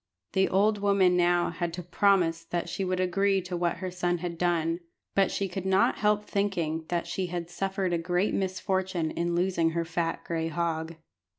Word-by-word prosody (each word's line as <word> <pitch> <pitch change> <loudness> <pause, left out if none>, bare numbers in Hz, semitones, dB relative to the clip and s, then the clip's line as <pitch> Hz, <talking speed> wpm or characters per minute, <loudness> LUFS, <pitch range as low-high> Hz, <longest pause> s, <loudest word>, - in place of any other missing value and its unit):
The 190 0 +3
old 205 +2 +3
woman 200 -3 +3
now 175 0 +3
had 170 0 -3
to 180 +1 -5
promise 175 -2 +2
that 175 0 -2
she 195 - -3
would 185 0 -1
agree 195 +2 +2
to 180 0 -4
what 175 0 0
her 185 0 -4
son 175 -1 0
had 175 0 -4
done; 170 -1 0 0.3
but 195 -1 +3
she 200 - -1
could 185 0 -5
not 190 0 +2
help 210 0 +2
thinking 170 -6 -1
that 175 -1 -1
she 180 +2 -2
had 175 -1 -5
suffered 190 0 -1
a 170 - +1
great 175 +4 0
misfortune 190 -3 -1
in 170 0 -1
losing 175 -2 +2
her 170 - 0
fat 165 0 -2
gray 165 -1 -2
hog. 165 0 -2
180 Hz, 190 wpm, -28 LUFS, 170-190 Hz, 0.3 s, The